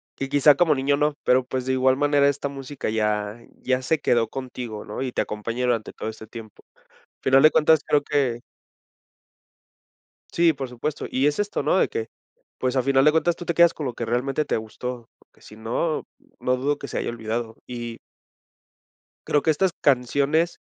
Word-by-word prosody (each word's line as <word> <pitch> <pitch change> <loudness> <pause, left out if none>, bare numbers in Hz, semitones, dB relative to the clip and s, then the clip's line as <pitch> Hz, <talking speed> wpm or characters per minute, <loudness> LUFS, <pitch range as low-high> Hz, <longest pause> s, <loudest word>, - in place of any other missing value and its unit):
que 135 - -4
quizá 145 +1 +5
como 160 +1 +3
niño 140 +1 +1
no, 150 +1 +1
pero, 125 0 +3
pues, 130 0 -4
de 130 - +1
igual 130 0 +3
manera 145 0 +3
esta 140 0 -1
música 135 -1 -5
ya 105 0 -1 0.2
ya 130 0 0
se 160 +3 +1
quedó 115 -4 +2
contigo 125 -4 -6
¿no?, 105 +5 -5
y 130 - -3
te - - 0
acompaña 115 +4 -3
durante 115 -3 -1
todo - - -5
este 110 0 -9
tiempo, 110 -1 -11
al - - -30 0.4
final 135 +1 +4
de 155 - +8
cuentas 155 0 +4
creo 145 - +3
que 140 -5 0 1.9
Sí, 170 -1 +4
por 135 -2 -6
supuesto, 130 +5 -4
y 135 +2 +1
es 150 - -1
esto 205 0 -1
¿no?, - - +2
de - - +3
que, 445 0 -4 0.5
pues, 130 0 -1
a 130 - +2
final 135 +1 +3
de 150 - +7
cuentas 165 +2 +2
tú 175 - -9
te 170 - 0
quedas 170 0 +5
con 150 - -5
lo 125 - -3
que 115 - -4
realmente 130 +6 0
te - - 0
gustó, 115 +2 -7
porque - - -29
si 105 - -14
no, 115 +9 -2 0.3
no 125 0 0
dudo 145 +3 0
que - - -8
se - - -5
haya - - -2
olvidado, 115 0 -4
y 120 -2 -6 1.3
creo 145 - +2
que 160 - 0
estas 180 +4 +2
canciones 140 +5 +2
130 Hz, 195 wpm, -24 LUFS, 120-145 Hz, 1.9 s, de